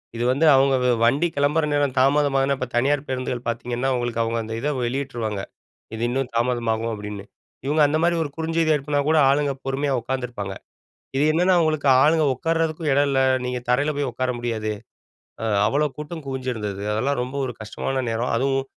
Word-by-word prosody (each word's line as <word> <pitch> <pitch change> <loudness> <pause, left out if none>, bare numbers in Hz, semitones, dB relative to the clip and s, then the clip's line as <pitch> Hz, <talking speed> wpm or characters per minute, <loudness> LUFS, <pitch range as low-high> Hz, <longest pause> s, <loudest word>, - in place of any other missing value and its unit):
இது 120 - -2
வந்து 145 +5 +2
அவங்க 135 0 +4
வ 125 - +3
வண்டி 140 +9 +3
கிளம்புற 145 +3 +2
நேரம் 145 -3 +1
தாமதமாகதுனா 140 0 +3
இப்ப 130 - -3
தனியார் 140 +3 +1
பேருந்துகள் 125 -2 -3
பார்த்தீங்கன்னா, 120 +2 -2
உங்களுக்கு 120 -1 -1
அவங்க 115 +1 -1
அந்த 110 0 -6
இத 145 - -1
வெளியிட்டுருவாங்க. 120 -5 -3 0.5
இது 110 - -6
இன்னும் 130 0 -1
தாமதமாகும் 115 -2 0
அப்டின்னு 105 -1 -7 0.4
இவங்க 150 +2 +2
அந்த 155 +2 +1
மாரி 170 0 +3
ஒரு 145 - -5
குறுஞ்செய்தி 165 0 0
எடுப்புனா 145 0 -1
கூட 160 0 +3
ஆளுங்க 145 0 +2
பொறுமையா 135 +1 -1
உட்காந்துருப்பாங்க. 120 -6 -4
அ - - -43 0.5
இது 145 - +3
என்னன்னா, 180 +3 +3
அவங்களுக்கு 155 -3 +1
ஆளுங்க 155 +1 +4
உட்காரறதுக்கும் 165 +1 -1
இடம் 145 +1 +3
இல்ல 135 -1 +2 0.2
நீங்க 125 0 -2
தரையில 145 +5 +2
போய் 140 -3 -1
உட்கார 130 0 -1
முடியாது. 110 -3 -2 0.7
அ - - -1 0.2
அவ்வளோ 150 +5 +2
கூட்டம் 150 +1 -7
குவிஞ்சிருந்தது 115 -7 -4
அதெல்லாம் 125 +5 0
ரொம்ப 130 +3 -7
ஒரு 125 - -4
கஷ்டமான 130 +4 -3
நேரம். 115 +2 -1
அதுவும் 135 +2 0
135 Hz, 170 wpm, -23 LUFS, 120-145 Hz, 0.7 s, அவங்க